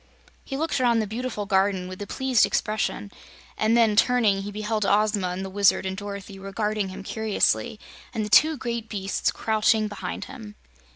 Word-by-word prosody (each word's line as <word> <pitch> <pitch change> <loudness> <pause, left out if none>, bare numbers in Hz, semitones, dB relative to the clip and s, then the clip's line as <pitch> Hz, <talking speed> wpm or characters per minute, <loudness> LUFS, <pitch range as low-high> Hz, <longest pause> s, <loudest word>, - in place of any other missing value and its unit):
He 270 - -5
looked 300 -3 -1
around 240 -2 +3
the 220 - +1
beautiful 220 0 -4
garden 190 -2 +1
with 185 +2 -8
a 205 - -5
pleased 260 -1 +2
expression, 210 -1 -1 0.4
and 220 +2 +2
then, 225 -3 +4
turning, 220 -4 +3
he 205 +1 -6
beheld 215 +1 -2
Ozma 205 -1 +2
and 180 +2 -4
the - - -4
Wizard 200 -1 +3
and 190 0 -2
Dorothy 200 -1 -7
regarding 205 +1 -2
him 185 - -8
curiously 220 +2 0 0.3
and 220 -3 -2
the - - -6
two 310 +5 +6
great 235 -3 -4
beasts 195 -2 -1
crouching 220 0 +1
behind 195 -3 -5
them. 105 -1 -10
210 Hz, 175 wpm, -25 LUFS, 195-225 Hz, 0.4 s, two